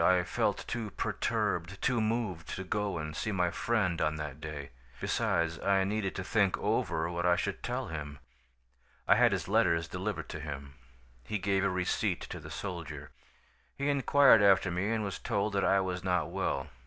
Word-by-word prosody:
I 90 0 +4
felt 85 - -1
too 115 -3 -3
perturbed, 90 -1 -1
too 125 -3 +1
moved, 110 -7 -2
to 95 - -4
go 105 0 -1
and 75 -1 -5
see 110 - -2
my 90 -3 +1
friend 100 -7 0
on 75 0 +1
that 75 -1 -6
day. 75 -2 -6 0.3
Besides, 85 0 0
I 100 -1 +3
needed 100 0 -1
to 95 - -3
think 100 -1 +2
over 80 0 0
what 85 0 -2
I 90 - +5
should 100 +2 -2
tell 125 0 -3
him. 75 -2 -5 0.9
"I - - +7
had - - +5
his - - -1
letters 85 -2 +2
delivered 90 -2 -4
to 80 - -5
him. 70 -2 -7 0.5
He 105 - -2
gave 95 0 +1
a 100 - +3
receipt 90 -1 0
to - - -5
the - - -10
soldier. - - -6 0.7
He 140 +1 0
inquired 140 -4 +6
after 95 -2 +5
me 90 +4 -1
and 115 -1 0
was 100 -2 -4
told 105 -2 -1
that 100 - +1
I 100 - +4
was 90 -2 -3
not 90 -4 0
well. 65 - -1
95 Hz, 185 wpm, -31 LUFS, 85-105 Hz, 0.9 s, I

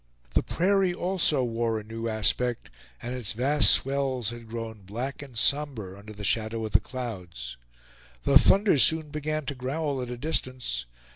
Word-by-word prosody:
The - - +4
prairie 190 0 +2
also 175 -7 +1
wore 115 -1 0
a - - -9
new 115 +2 -5
aspect, 110 - +1 0.3
and 120 +2 -3
its 125 -5 -3
vast 140 +6 +4
swells 130 -4 +1
had 120 -1 -10
grown 115 -2 -6
black 120 +9 -5
and 135 -5 -10
somber 130 -8 +1
under 100 +2 -11
the 105 -1 -9
shadow 110 +2 0
of 110 - -5
the - - +6
clouds. 90 - -6 0.7
The 140 0 +7
thunder 195 -2 +4
soon 155 +5 +4
began 155 0 -2
to 140 - -3
growl 135 +2 -2
at 125 - -5
a 125 - -5
distance. 125 - -2
125 Hz, 165 wpm, -27 LUFS, 110-145 Hz, 0.7 s, The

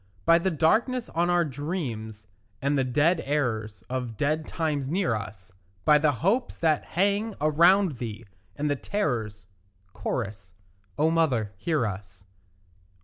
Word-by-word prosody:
By 165 0 +6
the 190 - 0
darkness 220 - +1
on 170 +2 0
our 175 -1 +3
dreams, 125 - -5 0.3
and 140 +1 0
the 135 - +2
dead 150 +7 +2
errors 110 - -2
Of 125 -3 -4
dead 155 +2 0
times 150 -5 -2
near 180 -5 +1
us; 105 -3 -6 0.3
By 150 -1 +6
the 150 0 +3
hopes 200 - 0
that 155 -3 +2
hang 200 +4 0
around 170 +2 +4
thee, 115 -1 -6 0.3
and 150 - -2
the 145 - +1
terrors; 115 - -2 0.6
(Cho.) 115 +3 -1 0.7
O 155 +2 +3
mother, 130 -11 +1
hear 150 - 0
us. 95 -2 -6
145 Hz, 140 wpm, -26 LUFS, 115-170 Hz, 0.7 s, By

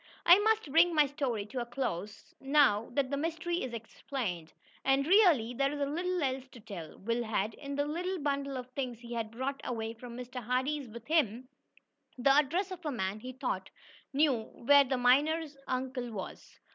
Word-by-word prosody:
I 350 +3 +9
must 440 -7 +1
bring 335 +2 +5
my 300 -1 +6
story 265 -7 -2
to 250 +5 -5
a - - -3
close, 215 -6 -4
now 270 -6 +3
that 270 0 0
the 280 - 0
mystery 335 +3 -2
is 255 - -3
explained. 225 - -5 0.3
And, 270 +1 +3
really, 330 - +5
there 275 +3 +1
is 295 - -4
little 345 +5 -1
else 265 -1 -2
to 245 - -11
tell. 175 -7 -9
Will 230 +4 -1
had, 220 -1 -1
in 280 +3 -6
the 285 0 +1
little 355 +5 -2
bundle 280 -3 -2
of 250 -1 -6
things 250 -3 -4
he 240 0 -8
had 230 -2 -2
brought 260 +5 -4
away 225 -2 -3
from 235 +1 -10
Mr. 250 0 -6
Hardee's 260 +4 -1
with 235 +1 -10
him, 255 -6 +1 0.7
the 255 +2 +4
address 330 +7 +2
of 360 -1 -7
a 300 - -2
man 195 -4 -2
he 255 +4 -7
thought 385 - -3 0.4
knew 275 -4 +3
where 285 +5 +4
the 260 0 0
miner 290 +7 +3 0.2
uncle 255 -1 -2
was. 195 -4 -8
265 Hz, 185 wpm, -31 LUFS, 235-295 Hz, 0.7 s, I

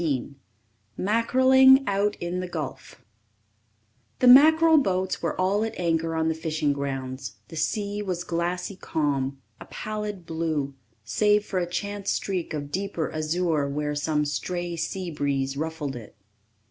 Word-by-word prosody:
] 110 -1 -26
Mackereling 260 +5 +5
Out 205 +1 +1
in 175 +1 -4
the 185 - -3
Gulf 160 -6 -6 1.2
The - - +1
mackerel 315 +5 +8
boats 190 -6 -1
were 170 +1 -2
all 195 +3 +2
at 225 -3 -4
anchor 165 -1 0
on 160 0 +1
the 160 - +2
fishing 155 -2 -1
grounds; 135 -4 -4
the - - -9
sea 205 +6 -1
was 180 -4 -3
glassy 175 +3 -2
calm 140 -6 -2 0.2
a - - -10
pallid 210 -4 -5
blue, 160 -4 -2 0.3
save 210 - +2
for 185 - -2
a 175 -1 -2
chance 200 +2 -3
streak 185 -4 -2
of 145 -2 -5
deeper 190 -2 -2
azure 155 -2 0
where 150 +1 -2
some 150 0 0
stray 175 +4 -3
sea 180 +1 -3
breeze 140 -2 -1
ruffled 155 -2 -4
it. 115 -4 -10
170 Hz, 145 wpm, -25 LUFS, 145-200 Hz, 1.2 s, mackerel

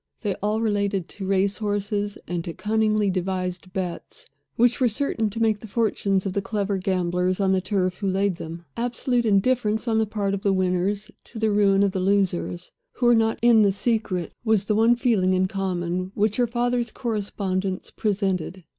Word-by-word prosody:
They 205 -3 -1
all 210 +2 0
related 200 -4 0
to 195 -2 -6
race 195 +1 +1
horses, 205 -1 -2
and 175 -1 -3
to 170 - -5
cunningly 215 -1 +1
devised 185 -1 -3
bets 185 - -5 0.3
which 240 +1 +3
were 250 - +5
certain 225 -1 -1
to 220 +3 -6
make 220 -2 +2
the 220 - -10
fortunes 200 -3 0
of 190 - -2
the 200 - 0
clever 200 -1 -2
gamblers 180 0 0
on 195 -1 +2
the 190 -1 +2
turf 185 -1 -1
who 200 - -2
laid 195 -1 +1
them. 165 +1 -8
Absolute 245 0 0
indifference 220 +2 +2
on 220 -1 +2
the 220 - +1
part 200 -2 -1
of 195 - -2
the 200 -2 +2
winners 190 +3 0
to 235 - -10
the 220 -1 +1
ruin 200 -1 +4
of 200 - +2
the 190 - -2
losers, 185 -2 0 0.2
who 250 - -2
were 240 - +6
not 225 -1 +2
in 235 -2 +6
the 200 -2 +4
secret, 200 -5 -1
was 220 -4 +2
the 210 - +1
one 225 +3 +4
feeling 205 -7 +2
in 185 0 +2
common, 185 -1 -2
which 210 0 +1
her 245 -1 +2
father's 240 0 0
correspondents 195 -4 -3
presented. 190 -4 -2
200 Hz, 190 wpm, -24 LUFS, 185-220 Hz, 0.3 s, were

